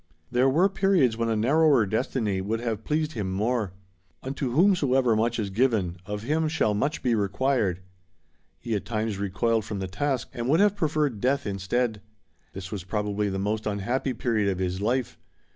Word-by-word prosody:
There 125 +2 +3
were 170 +8 +4
periods 195 - +2
when 115 0 -1
a 110 - +1
narrower 135 +2 +4
destiny 110 -2 -1
would 110 +4 -2
have 115 -2 -3
pleased 155 +3 0
him 100 -8 -3
more. 110 +1 0 0.5
"Unto 135 -1 -3
whomsoever 135 - +3
much 115 +2 +1
is 105 -4 -2
given, 105 -6 +1
of 105 0 -4
him 155 +5 +1
shall 150 -9 +1
much 140 +9 -1
be 125 - +2
required." 105 -2 0 0.8
He 115 -2 -4
at 105 - -1
times 110 -3 -2
recoiled 110 +3 0
from 105 0 -5
the 95 -1 -3
task, 135 +5 -2
and 120 +1 -3
would 160 +4 +4
have 205 0 +4
preferred 150 - 0
death 135 +3 +1
instead. 105 +3 -1 0.5
This 95 0 -7
was 100 -4 -4
probably 105 +1 -1
the 95 - -3
most 105 +3 -2
unhappy 120 +6 -1
period 110 -4 0
of 95 - -1
his 95 0 -2
life. 120 +3 -1
115 Hz, 175 wpm, -26 LUFS, 100-135 Hz, 0.8 s, were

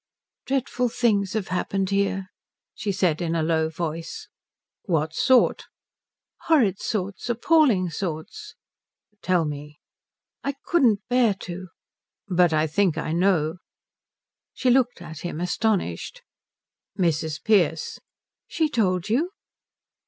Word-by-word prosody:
"Dreadful 255 -2 0
things 205 -5 +1
have 215 -3 -2
happened 190 +1 -1
here," 195 -1 0 0.4
she 200 - -3
said 180 -4 +1
in 165 -1 -1
a 165 - +1
low 160 0 +1
voice. 165 0 -5 0.6
"What 160 -4 0
sort?" 255 +7 +3 0.8
"Horrid 235 - +3
sorts. 200 +2 -3
Appalling 240 - +3
sorts." 160 +2 -5 0.7
"Tell 180 -3 +2
me." 150 0 -7 0.6
"I 280 0 -2
couldn't 235 - +2
bear 245 -4 +3
to." 185 +1 -7 0.6
"But 180 -3 +3
I 155 0 +2
think 180 +2 +1
I - - -2
know." 170 -3 +2 1.0
She 255 - +1
looked 245 -7 +2
at 160 -2 -9
him 175 -2 -5
astonished. 180 - -1 0.7
"Mrs. 160 -3 0
Pearce 175 -8 +2 0.2
" - - -67
"She 315 -2 0
told 185 - +1
you?" 270 +11 +1
185 Hz, 115 wpm, -24 LUFS, 165-225 Hz, 1.0 s, sort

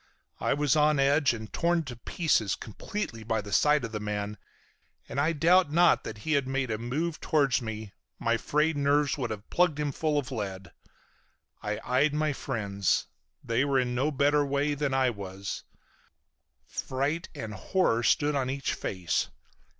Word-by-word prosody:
I - - +1
was 145 -1 +2
on 150 0 +4
edge 140 0 +4
and 110 -2 -7
torn 170 0 +1
to 130 -4 -7
pieces 120 - 0
completely 115 - -5
by 110 0 0
the 100 -1 -6
sight 150 -2 +4
of 115 - -7
the 105 - -3
man, 105 0 -3 0.7
and - - -3
I 155 +3 +2
doubt 170 +1 +4
not 175 +2 +4
that 110 - -6
had 145 -4 +2
he 130 - -5
made 135 -3 -1
a 110 - -2
move 150 +8 -2
towards 140 -7 +2
me 110 -3 -6 0.2
my 115 0 +1
frayed 150 +7 +1
nerves 145 0 +2
would 120 -3 -1
have 105 -1 -6
plugged 175 -4 +2
him 145 -1 0
full 150 +2 0
of 140 -2 -2
lead. 100 -5 -5 0.9
I 105 0 -3
eyed 140 +4 +2
my 155 -1 +1
friends. 100 -8 -1 0.4
They 115 +3 +1
were 140 -1 +1
in 125 -1 0
no 130 +5 +1
better 145 +1 +3
way 140 +1 0
than 145 -1 -1 0.2
was 100 0 -6
I. - - -36 0.9
Fright 140 +6 -2
and 110 -1 -5
horror 115 - +1
stood 145 +5 +2
on 135 -2 0
each 135 +1 -1
face. 90 -3 -1
135 Hz, 175 wpm, -28 LUFS, 110-150 Hz, 0.9 s, on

